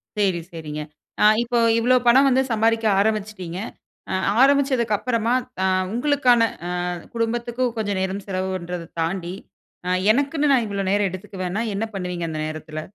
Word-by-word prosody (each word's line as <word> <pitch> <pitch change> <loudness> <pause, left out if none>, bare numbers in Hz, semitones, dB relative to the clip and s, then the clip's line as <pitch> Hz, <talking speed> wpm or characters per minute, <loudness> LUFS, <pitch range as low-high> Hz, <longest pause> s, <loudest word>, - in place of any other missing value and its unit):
சேரி 195 -4 +1
சேரிங்க. 155 -2 -6 0.4
அ - - +6 0.2
இப்போ 240 0 0 0.2
இவ்வளோ 245 +2 +3
பணம் 265 +4 +6
வந்து 260 0 +3
சம்பாரிக்க 225 0 +2 0.2
அரம்பிச்சுட்டீங்க. 200 -4 -2 0.5
அ - - -1 0.3
அரம்பிச்சதுக்கு 265 -5 +3
அப்புறமா, 230 -1 0 0.3
அ - - +3 0.3
உங்களுக்கான, 250 -1 +3 0.3
அ - - -3 0.5
குடும்பத்திக்கு 235 +2 -1
கொஞ்ச 210 -2 -1
நேரம் 190 +1 -3
செலவு 190 -1 -2
பண்றத 175 -1 -5 0.2
தாண்டி, 170 +1 -2 0.5
அ - - 0 0.2
எனக்குன்னு 285 +3 +1
நா - - +6
இவ்ளோ 200 -1 -3
நேர 205 +1 +2
எடுத்துக்குவேனா 185 +2 -4
என்ன 205 - -1
பண்ணுவீங்க 180 -2 -3
அந்த 155 -1 -4
நேரத்தில? 155 0 -6
210 Hz, 145 wpm, -22 LUFS, 180-240 Hz, 0.5 s, அ